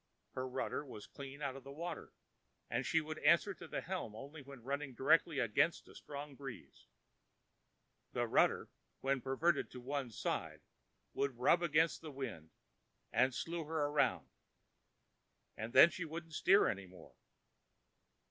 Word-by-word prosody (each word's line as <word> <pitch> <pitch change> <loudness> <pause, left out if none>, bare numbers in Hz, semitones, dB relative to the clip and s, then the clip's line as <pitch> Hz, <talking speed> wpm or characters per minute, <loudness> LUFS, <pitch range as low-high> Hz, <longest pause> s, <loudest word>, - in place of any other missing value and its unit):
Her 130 0 -3
rudder 130 +3 -2
was 105 -7 -9
clean 140 +3 -9
out 135 -2 -2
of 135 - -9
water 155 +6 -6 0.6
and - - +1
she 160 +4 +3
would 155 0 -6
answer 170 +6 +4
the 170 -3 -5
helm 175 - -4
only 140 +6 -9
when 135 -3 -12
running 140 0 -3
directly 155 +4 +4
against 125 +7 +2
a - - -14
strong 145 0 -7
breeze: 135 -2 -10 1.2
the - - 0
rudder, - - +3 0.3
when 135 -1 +1
perverted 140 +5 +1
to 125 - -9
one 135 0 -3
side, 110 - -3 0.5
would 140 -3 -1
rub 170 +8 +4
against 160 0 +2
the 160 - -7
wind 115 - -6 0.6
and 130 -1 +3
slew 165 -1 -3
her 155 -1 0
around; 145 0 +1 1.3
and 110 +2 -5
then 140 +7 +9
she 180 - -4
wouldn't 165 +1 -7
steer 195 +6 +5
any 100 -2 -2
more. 90 0 -14
140 Hz, 145 wpm, -36 LUFS, 130-160 Hz, 1.3 s, then